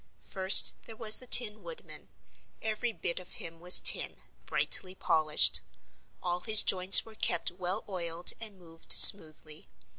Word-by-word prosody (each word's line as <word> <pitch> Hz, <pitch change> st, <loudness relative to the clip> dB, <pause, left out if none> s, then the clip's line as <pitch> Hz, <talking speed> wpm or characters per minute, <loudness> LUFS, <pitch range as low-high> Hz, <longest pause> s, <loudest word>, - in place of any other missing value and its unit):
First 190 Hz, 0 st, +3 dB
there 225 Hz, -, -15 dB
was 215 Hz, -1 st, -1 dB
the 255 Hz, -, -17 dB
Tin 220 Hz, -3 st, -1 dB
Woodman. 485 Hz, -1 st, -15 dB, 0.5 s
Every 220 Hz, +2 st, -9 dB
bit 175 Hz, -5 st, -10 dB
of 185 Hz, -, -18 dB
him 165 Hz, 0 st, -14 dB
was 180 Hz, +2 st, +2 dB
tin, -, -, 0 dB, 0.3 s
brightly 185 Hz, -1 st, -3 dB
polished. 155 Hz, -4 st, -1 dB, 0.6 s
All 175 Hz, 0 st, -8 dB
his 215 Hz, +2 st, +5 dB
joints 185 Hz, 0 st, +2 dB
were 225 Hz, -, -20 dB
kept 215 Hz, -, -6 dB
well 180 Hz, +1 st, -9 dB
oiled 175 Hz, -3 st, -4 dB
and 215 Hz, -3 st, -15 dB
moved 165 Hz, -2 st, -16 dB
smoothly. 155 Hz, -4 st, +3 dB
185 Hz, 145 wpm, -24 LUFS, 170-215 Hz, 0.6 s, his